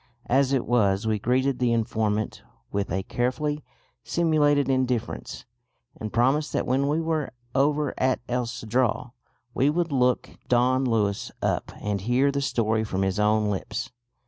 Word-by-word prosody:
As 135 +1 +2
it 135 -3 +1
was 105 -4 +2
we 110 -1 +1
greeted 130 +4 +1
the 125 -2 +2
informant 110 -2 -1 0.3
with 100 -3 -2
a 95 +2 -1
carefully 145 +7 -1 0.4
simulated 150 -4 +2
indifference, 130 -3 -1 0.5
and 110 -1 -6
promised 135 +6 +2
that - - 0
when 135 +2 +1
we 150 +3 +1
were 160 -2 -1 0.2
over 145 +2 +2
at 130 0 +2
El 125 -1 -1
Cedral 120 +1 -1 0.4
we 135 +5 +3
would 170 +1 0
look 125 -2 +2 0.2
Don 130 +2 +3
Luis 105 -4 0
up - - 0
and 100 -2 -2
hear 125 +6 +2
the 140 0 -1
story 110 -4 +1
from 95 -3 -1
his 95 +1 0
own 105 0 +2
lips. 105 +4 -4
125 Hz, 150 wpm, -25 LUFS, 110-140 Hz, 0.5 s, we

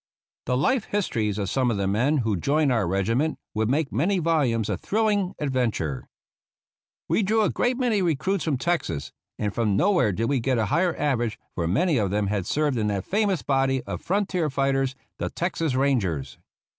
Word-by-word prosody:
The 125 - +1
life 210 - +1
histories 110 - -1
of 100 -2 -2
some 130 +4 +1
of 115 - 0
the 100 - 0
men 120 +10 +2
who 110 -2 +1
joined 140 - +1
our 115 -7 +1
regiment 115 - 0 0.2
would 110 +1 0
make 145 +2 0
many 190 +7 +1
volumes 145 - +1
of 100 -5 -3
thrilling 205 -3 0
adventure. 120 - -1 1.0
We - - +2
drew 215 +2 +2
a - - +1
great 245 0 0
many 240 -6 +1
recruits 175 +2 0
from 150 -5 +1
Texas; 125 - -2 0.3
and 105 -2 -2
from 105 -4 +1
nowhere 180 - +3
did 110 +5 -1
we 140 +1 +1
get 130 +1 0
a 110 - +1
higher 170 +1 +2
average, 120 -6 0 0.2
for 85 -2 -2
many 150 - +2
of 100 -3 0
them 105 +1 0
had 100 -3 -2
served 145 -5 +1
in 105 - 0
that 100 -2 -2
famous 200 -3 0
body 135 -2 +1
of - - -5
frontier 185 -4 0
fighters, 135 -1 0 0.2
the - - -2
Texas 165 -5 -2
Rangers. 115 - 0
135 Hz, 185 wpm, -25 LUFS, 110-170 Hz, 1.0 s, nowhere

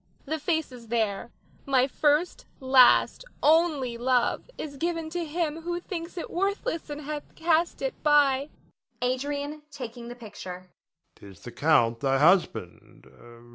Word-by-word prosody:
The 315 +2 -3
face 320 -1 -1
is 240 -2 -12
there; 220 -1 -1 0.4
my 260 -2 +4
first, 300 +5 +1
last, 260 - +5 0.2
only 300 -7 +3
love 250 - +1
is 285 -2 -6
given 330 0 -2
to 350 +1 -2
him 325 0 -2
who 345 +1 -3
thinks 350 0 -7
it 340 - -5
worthless 390 -2 -2
and 295 0 -5
hath 300 0 -7
cast 330 +1 +1
it - - -1
by. 285 -2 +3 0.5
Adrian 285 +4 -2
[taking 240 -4 -8
the 240 - -8
picture]. 185 -6 -9 0.4
'Tis 100 -3 -15
the 120 - -9
Count, 120 -7 +2
thy 135 -1 +1
husband. 175 - +1
285 Hz, 135 wpm, -27 LUFS, 235-320 Hz, 0.5 s, last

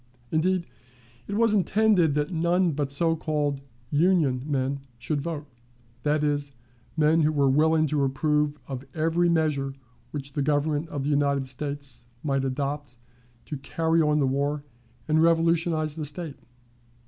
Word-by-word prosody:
Indeed, 170 +2 +1 0.6
it 200 - -3
was 225 0 +3
intended 195 -5 +3
that 150 +4 -1
none 170 +2 +2
but 140 -2 -2
so 165 +3 +2
called 150 -3 -1 0.3
"Union" 150 -5 +3
men 140 -1 -1 0.2
should 140 +5 -2
vote 155 -1 -4 0.6
that 150 +3 +1
is, 145 -1 -1 0.4
men 155 +1 +4
who 155 0 +3
were 140 -2 +2
willing 155 +3 +4
to 150 -1 0
approve 150 +2 +1
of 130 -2 -5
every 165 +2 +2
measure 150 -5 0 0.3
which 140 -2 -6
the 145 - -1
Government 150 +2 0
of 145 -2 -3
the 145 - 0
United 140 -1 +2
States 140 -1 -5 0.2
might 135 -3 0
adopt 140 -1 -3 0.5
to 150 - -5
carry 165 +4 +1
on 150 -1 +3
the 145 - +3
war 140 +2 0 0.4
and 155 0 +3
revolutionize 165 -2 +2
the 155 -2 -4
State. 150 0 -5
150 Hz, 150 wpm, -26 LUFS, 140-160 Hz, 0.6 s, men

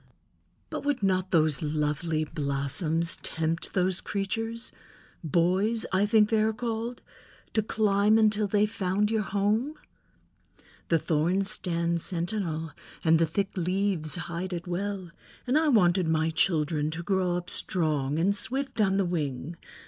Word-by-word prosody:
"But - - -4
would 285 -6 -1
not 185 -1 +1
those 155 -4 +2
lovely 155 +1 -1
blossoms 150 +3 -1
tempt 165 +1 -3
those 185 -1 +2
creatures—boys, 200 - -2
I 195 +2 +3
think 215 0 +4
they 220 -1 +3
are 220 +1 +2
called—to 230 -1 -5
climb 210 0 +2
until 215 -1 +3
they 205 +1 +3
found 210 -1 0
your 220 -1 +1
home?" 210 +8 0 1.1
"The 165 - +4
thorns 175 +6 +1
stand 170 -4 -1
sentinel 170 -3 -2 0.3
and 160 0 +4
the 165 - +3
thick 195 +5 -2
leaves 180 -4 0
hide 175 +2 -4
it 170 -1 -4
well, 185 0 -3 0.3
and 255 +2 0
I 315 +1 +4
wanted 185 - +4
my 160 0 +1
children 155 -2 +1
to 165 +2 -5
grow 185 -1 +1
up 175 0 -6
strong, 150 -5 0
and 190 +5 +2
swift 265 0 -2
on 195 -2 +3
the 195 - +2
wing. 155 -3 -3
185 Hz, 135 wpm, -28 LUFS, 165-210 Hz, 1.1 s, think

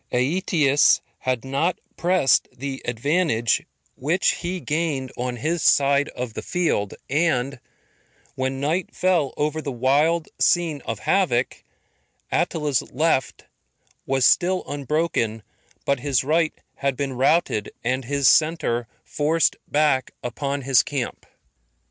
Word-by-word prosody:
Aetius 145 +1 +3 0.2
had 130 -1 -2
not 140 +7 0 0.2
pressed 175 -6 +2
the 135 +1 -6
advantage 120 -1 +1 0.3
which 160 +8 +1
he 180 +1 -4
gained 150 -5 -2
on 125 0 -3
his 160 +7 -2
side 140 0 +3
of 125 -3 -4
the - - -5
field, 165 - -1
and 140 -4 0 0.7
when 130 0 -2
night 160 +6 -1
fell 175 -7 +1
over 150 +1 -1
the 145 - -4
wild 145 +7 +2
scene 165 -5 +2
of 115 - -3
havoc, 135 -11 +1 0.7
Attila's 150 -5 0
left 155 0 0 0.6
was 135 -1 +2
still 185 +7 +3
unbroken, 140 -6 -1 0.4
but 140 -2 +1
his 135 -1 +1
right 155 +3 +1 0.2
had 135 -2 -1
been 140 -2 -2
routed, 130 - +1
and 130 +1 -1
his 140 0 +1
centre 155 -8 +2 0.2
forced 155 +2 +1
back 145 -4 +2
upon 140 +3 -3
his 130 -1 +5
camp. 135 -4 -5
140 Hz, 120 wpm, -23 LUFS, 130-160 Hz, 0.7 s, his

